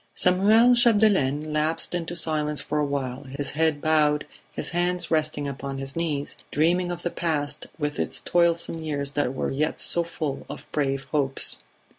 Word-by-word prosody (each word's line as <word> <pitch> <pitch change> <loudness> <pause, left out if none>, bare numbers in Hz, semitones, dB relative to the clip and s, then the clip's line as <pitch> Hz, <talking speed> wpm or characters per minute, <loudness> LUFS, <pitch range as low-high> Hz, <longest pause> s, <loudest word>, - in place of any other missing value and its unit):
Samuel 215 +7 +5
Chapdelaine 205 - +3
lapsed 155 +3 -1
into 175 -1 -3
silence 150 -2 +1
for 150 - -2
a 150 - +2
while, 135 -1 -3
his 140 +2 -3
head 155 -1 0
bowed, 150 -1 +2 0.3
his - - -2
hands 175 0 -1
resting 155 -2 0
upon 140 0 -5
his 135 0 -4
knees, 155 -4 -2
dreaming 175 +4 +1
of 175 0 -6
the 175 - -2
past 150 -4 -2
with 150 -2 -3
its - - 0
toilsome 170 -1 +1
years 145 -3 -3
that 145 -3 -1
were - - -2
yet 155 +3 -1
so 170 - +2
full 155 -4 -5
of - - -7
brave 135 -2 -1
hopes. 135 -3 +3
155 Hz, 165 wpm, -25 LUFS, 145-170 Hz, 0.3 s, Samuel